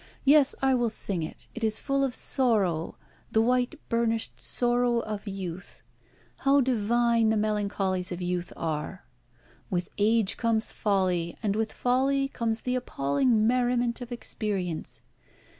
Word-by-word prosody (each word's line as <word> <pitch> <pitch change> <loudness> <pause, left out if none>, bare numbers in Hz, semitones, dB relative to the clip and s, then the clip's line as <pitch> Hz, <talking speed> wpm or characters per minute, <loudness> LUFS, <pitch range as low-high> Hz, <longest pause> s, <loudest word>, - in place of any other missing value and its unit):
Yes, 285 0 +5
I 265 0 +4
will 240 -2 +2
sing 200 -4 -4
it. 160 - -7
It 235 - -6
is 215 -1 +1
full 275 0 0
of 265 -2 0
the - - -2
sorrow, 200 - +2 0.4
the 220 - +4
white 250 +5 +1
burnished 230 -1 -1
sorrow 240 -1 +1
of 210 -1 -6
youth. 185 -3 -7 0.5
How 280 +1 +3
divine 235 -2 +2
the 220 - +2
melancholies 200 -3 -1
of 175 - -4
youth 180 -1 -3
are! 160 +3 -4 0.6
With 175 -1 -2
age 215 -1 +2
comes 225 -2 +1
folly, 185 -4 0
and 205 -2 +1
with 220 0 -1
folly 270 +2 +1
comes 230 -3 -2
the 250 - -2
appalling 215 - +1
merriment 245 0 +1
of 245 0 -7
experience. 195 -8 -4
225 Hz, 140 wpm, -27 LUFS, 190-245 Hz, 0.6 s, Yes